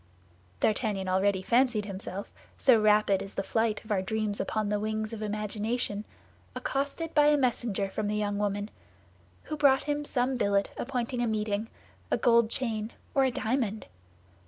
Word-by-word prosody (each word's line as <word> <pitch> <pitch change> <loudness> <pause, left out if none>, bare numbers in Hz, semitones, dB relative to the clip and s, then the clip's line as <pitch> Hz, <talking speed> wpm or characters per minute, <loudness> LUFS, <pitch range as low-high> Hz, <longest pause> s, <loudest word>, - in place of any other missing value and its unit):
D'Artagnan 210 -3 +1
already 190 +1 +2
fancied 240 -2 +2
himself, 195 0 -6 0.3
so 235 -5 +5
rapid 210 -2 +4
is 195 - -8
the 195 - -1
flight 225 +1 0
of 215 - -8
our 195 -2 +2
dreams 210 +1 -1
upon 215 -1 -1
the 210 0 0
wings 215 +1 -2
of 220 - -6
imagination, 210 +1 -2 0.5
accosted 285 +4 -2
by 295 -1 +5
a 295 0 +5
messenger 235 -6 0
from 205 +2 -3
the 210 - -1
young 205 -1 -1
woman, 205 0 -1 0.7
who 305 - -4
brought 280 -3 +4
him 295 0 -1
some 255 -2 0
billet 200 -3 +1
appointing 245 -1 -2
a 240 - +1
meeting, 215 0 -1 0.4
a - - +2
gold 235 -2 +4
chain, 225 -3 -1 0.2
or 270 -1 +4
a 260 - +1
diamond. 225 -3 -1
215 Hz, 160 wpm, -29 LUFS, 205-245 Hz, 0.7 s, so